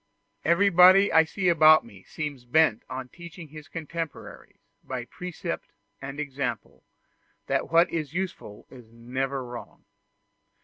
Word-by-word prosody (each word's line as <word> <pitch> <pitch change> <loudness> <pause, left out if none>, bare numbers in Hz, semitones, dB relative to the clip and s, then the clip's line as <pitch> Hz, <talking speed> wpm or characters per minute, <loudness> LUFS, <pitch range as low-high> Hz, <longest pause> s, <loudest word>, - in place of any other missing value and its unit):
Everybody 185 +2 +5
I 160 0 +6
see 185 +3 -3
about 155 -2 +6
me 100 -5 -15
seems 145 +2 -6
bent 125 -2 +2
on 130 0 -6
teaching 170 0 -11
his 155 +1 -11
contemporaries, 165 -1 -7 0.3
by 125 -2 -5
precept 180 +5 -7 0.3
and 135 +1 -7
example, 135 -5 -5 0.6
that - - -1
what 170 +2 +5
is 155 -4 -3
useful 180 - -5
is 120 -4 -14
never 130 +3 -4
wrong. 120 0 -10
150 Hz, 125 wpm, -26 LUFS, 130-170 Hz, 0.6 s, I